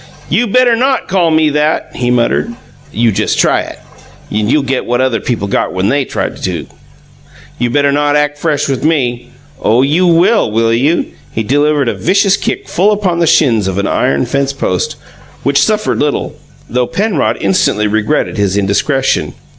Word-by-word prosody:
"You 240 - +1
better 245 +2 +3
NOT 260 +3 0
call 180 -3 +1
me 155 -1 +2
that!" 150 +2 0
he 120 -1 -1
muttered. 125 - +1 0.4
"You 115 0 +1
just - - -1
try - - +2
it, - - -9 0.5
and 105 +2 0
you'll 150 - +2
get 135 -1 -2
what 120 0 0
other 130 -3 +1
people 115 -2 -3
got 100 - -1
when 95 +2 0
THEY 140 0 +1
tried - - -4
it. - - -4 0.9
You 120 0 0
better 140 +2 +2
not 145 +1 +1
ack 150 0 +1
fresh 150 -1 -1
with 135 -1 -2
ME! 125 -6 0 0.3
Oh, 115 +4 +3
you 160 +7 +2
WILL, 170 - +3
will 115 +1 +1
you?" 140 +8 +1 0.3
He 110 - -2
delivered 145 +3 +1
a - - 0
vicious 195 +2 +2
kick - - -4
full 195 +4 +2
upon 195 -5 0
the 170 - +2
shins 115 -12 +3
of 95 0 -3
an 100 - 0
iron 70 -7 0
fence 140 0 -1
post, 90 -9 -2 0.5
which 140 0 +2
suffered 215 -1 0
little, 145 -1 -1 0.3
though 125 +1 -1
Penrod 200 -7 0
instantly 105 - +1
regretted 105 +1 -1
his 100 -1 0
indiscretion. 115 +8 0
140 Hz, 180 wpm, -13 LUFS, 115-165 Hz, 0.9 s, better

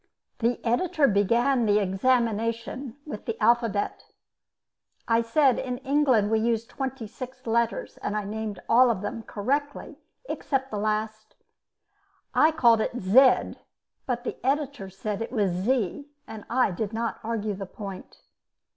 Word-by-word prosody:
The 235 +1 +1
editor 280 +5 +2
began 235 +4 +2
the 205 0 +4
examination 230 +4 0
with 250 -9 -7
the 225 - -4
alphabet. 230 -2 +1 1.0
I 230 0 +3
said 260 +3 +3
in 250 -1 -3
England 265 -6 +2
we 220 - +3
used 230 0 -1
twenty 265 -3 -4
six 255 +4 -9
letters, 230 0 -1
and 210 - -3
I 210 - -2
named 210 -1 -5
all 245 +2 +6
of 220 -5 0
them 230 +2 -4
correctly 280 +8 -3 0.3
except 270 -1 -2
the 210 - -2
last. 215 +1 -2 1.0
I 310 - +5
called 240 -8 +4
it 245 - -2
"zed," 250 +7 +4 0.5
but 245 -2 -2
the - - -6
editor 275 -6 -1
said 205 +2 -4
it 230 - -4
was 205 -7 +1
"zee," 220 - -1 0.2
and 215 -2 -9
I 250 -2 +2
did 205 +4 -4
not 230 +1 -2
argue 220 -2 -2
the 195 0 -6
point. 195 -1 -9
230 Hz, 145 wpm, -26 LUFS, 210-255 Hz, 1.0 s, all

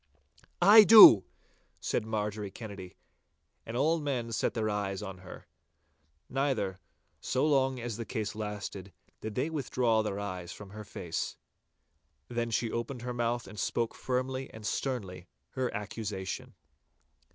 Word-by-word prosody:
'I 210 +3 +9
do!' 195 - +10 0.5
said 110 - -2
Marjorie 105 -2 -3
Kennedy, 100 -3 -9 0.7
and 115 - -4
all 160 +5 +2
men 130 -6 -2
set 110 - -1
their 110 -2 0
eyes 105 -1 -2
on 95 -2 -7
her. 95 0 -11 0.8
Neither, 130 -9 -1 0.4
so 130 - 0
long 135 -3 +2
as 115 -2 -4
the 115 - -4
case 105 0 -3
lasted, 105 -3 -6 0.3
did 110 -1 -6
they 140 +6 -1
withdraw 125 -6 +1
their 100 -2 -3
eyes 90 -4 -5
from 100 -2 -10
her 105 +1 -8
face. 90 -4 -5 0.9
Then 120 -1 -2
she 115 0 -1
opened 120 +1 -4
her 125 0 -3
mouth 120 0 -1
and 100 +2 -10
spoke 115 -1 -1
firmly 130 +1 -3
and 110 -1 -10
sternly 100 -9 -3 0.2
her 130 -1 -2
accusation. 105 -2 -5
110 Hz, 140 wpm, -30 LUFS, 100-125 Hz, 0.9 s, do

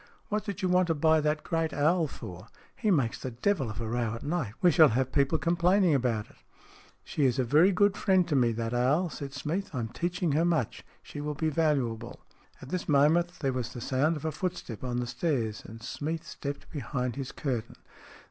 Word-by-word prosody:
What 210 -1 -1
did 200 -1 -5
you - - +3
want 180 0 +3
to 165 - +1
buy 160 +1 +4
that 150 0 0
great 165 -1 -1
owl 160 +3 +2
for? 90 -6 -9 0.3
He 215 - -1
makes 135 - +1
the 130 - -3
devil 135 - 0
of 110 0 -6
a 115 - -3
row 115 -1 -1
at 115 - -8
night. 145 -9 -2
We 180 - +5
shall 160 0 +7
have 130 +3 0
people 140 -1 +2
complaining 175 +1 +3
about 120 -6 0
it." - - -21 0.4
" - - -26
She 150 - -2
is 130 -1 +2
a 130 - +2
very 155 +10 +5
good 200 +1 +3
friend 190 -3 +2
to 155 - 0
me, 120 -3 +3
that 115 +1 -3
owl," 145 +8 +2
said 140 -1 -6
Smeath. 160 +7 -3
" - - -25
I - - -1
am 110 -1 -3
teaching 175 +4 -1
her 155 +4 +2
much. 165 -9 0 0.2
She 145 - -7
will 150 0 -3
be 160 +2 0
valuable." 135 -7 -1 0.4
At 130 - -10
this 180 0 -3
moment 160 +5 +4
there 135 -3 0
was 125 -3 -3
the - - -6
sound 140 +7 +1
of 150 - -8
a 160 - 0
footstep 170 - -4
on 125 -1 -2
the 125 - -1
stairs, 120 -4 -1
and 115 +1 -11
Smeath 160 +6 -4
stepped 140 -2 -6
behind 125 -4 -3
his 135 -2 -5
curtain. 120 -6 -3
145 Hz, 225 wpm, -29 LUFS, 125-170 Hz, 0.4 s, shall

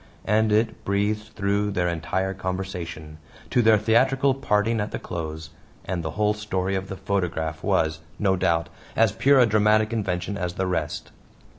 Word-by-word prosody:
and 110 +1 +2
it 110 +2 +1
breathed 105 +2 0
through 100 +1 0
their 90 -3 0
entire 95 +3 -1
conversation 90 -5 -5 0.3
to 125 - +4
their 110 -1 +6
theatrical 130 +6 +3
parting 115 -4 +1
at 105 - -2
the - - -4
close! 80 -2 -6 0.3
And 90 -2 -2
the 80 - -3
whole 105 0 +3
story 95 -3 -2
of 95 0 -2
the 95 - -6
photograph 80 -6 -2
was, 80 0 +1 0.2
no 95 -2 +2
doubt, 85 -3 +1 0.3
as 115 -3 +4
pure 130 +6 +4
a 125 - +7
dramatic 110 0 +3
invention 95 -2 -2
as 90 -1 -3
the 95 - -1
rest! 90 -1 -3
100 Hz, 165 wpm, -24 LUFS, 90-110 Hz, 0.3 s, a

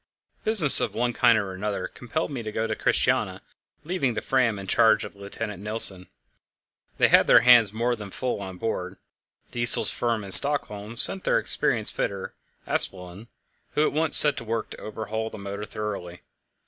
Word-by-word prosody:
Business 195 -10 +7
of - - -5
one 120 +1 -3
kind 115 -1 +1
and 100 -2 -4
another 95 0 -6
compelled 150 +6 -7
me 130 -4 -7
to 110 -1 -9
go 110 +1 -5
to 110 -1 -5
Christiania, - - -2 0.4
leaving 150 -8 -4
the - - -5
Fram 125 -5 -2
in 100 - -10
charge 110 +3 0
of - - -13
Lieutenant 100 0 -10
Nilsen. 100 -3 +2 0.9
They - - +1
had - - +2
their - - +4
hands 120 -4 +3
more 120 +3 -3
than 105 -3 -12
full 125 +1 -6
on 95 -2 -10
board. 95 -3 -7 0.5
Diesel's 120 0 +1
firm 115 -3 -4
in 100 - -11
Stockholm 115 -5 +6
sent 95 -3 +2
their - - -1
experienced - - -1
fitter, 100 -1 -6 0.3
Aspelund, 90 +3 -3 0.5
who 150 - 0
at - - -4
once 155 0 +4
set 150 -1 +5
to 120 - -8
work 115 0 -6
to - - -13
overhaul 110 +1 -7
the - - -13
motor 100 +1 -9
thoroughly. 100 -5 -9
110 Hz, 175 wpm, -22 LUFS, 100-120 Hz, 0.9 s, Business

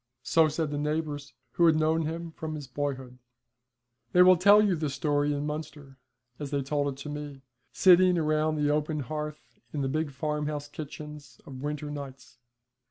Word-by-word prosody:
So 160 +3 +4
said 155 0 -2
the 145 - -2
neighbours, 150 -3 -3 0.2
who 170 - +4
had 160 - +5
known 155 0 +1
him 165 +1 -5
from 160 -1 -6
his 145 -2 -6
boyhood. 130 -2 -4 0.9
They 180 - +7
will 185 0 +7
tell 200 +4 +6
you 205 -4 +3
this 150 -4 -3
story 145 -1 +1
in 145 0 -2
Munster, 150 -3 -7 0.4
as 145 -2 -5
they 140 -1 -1
told 145 +1 0
it 135 - -10
to 150 - -6
me, 145 -2 -7 0.3
sitting 185 0 +6
round 155 -1 +1
the 145 0 +2
open 150 0 0
hearth 150 +3 -6
in 145 - -3
the 135 - 0
big 155 +3 -1
farmhouse 150 +1 -3
kitchens 150 -4 -9
of 130 -2 -9
winter 150 0 -4
nights. 135 -3 -9
150 Hz, 175 wpm, -28 LUFS, 145-155 Hz, 0.9 s, They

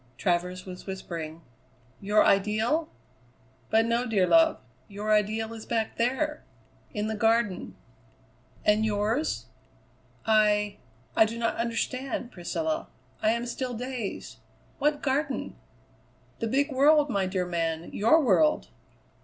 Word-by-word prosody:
Travers 180 +1 -1
was 185 0 -9
whispering. 165 -4 -6 0.6
"Your 210 +2 +3
ideal? 220 +11 +2 0.8
But 225 +1 +4
no, 235 +2 0
dear 205 -5 +3
love. 325 - +4 0.3
Your 210 +1 -3
ideal 215 +2 +1
is 225 -1 -9
back 225 -2 -1
there 265 +6 0 0.5
in 210 0 -2
the 220 - -2
Garden." 225 -2 +1 0.9
"And 210 +1 +4
yours? 220 +7 0 0.8
I 210 -2 +3 0.4
I 220 - +6
do 225 +2 -5
not 230 -1 0
understand, 240 +2 -2
Priscilla. 315 - -3 0.3
I 215 - +3
am 235 +2 0
still 245 0 -4
dazed. 245 -3 -5 0.4
What 295 +1 +1
Garden?" 275 - -1 0.8
"The 230 - -1
big 280 +5 +1
world, 290 +3 +5
my 195 -3 +1
dear 185 -1 -1
man; 165 -2 -2
your 265 +10 +4
world." 160 - +3
220 Hz, 120 wpm, -27 LUFS, 200-255 Hz, 0.9 s, I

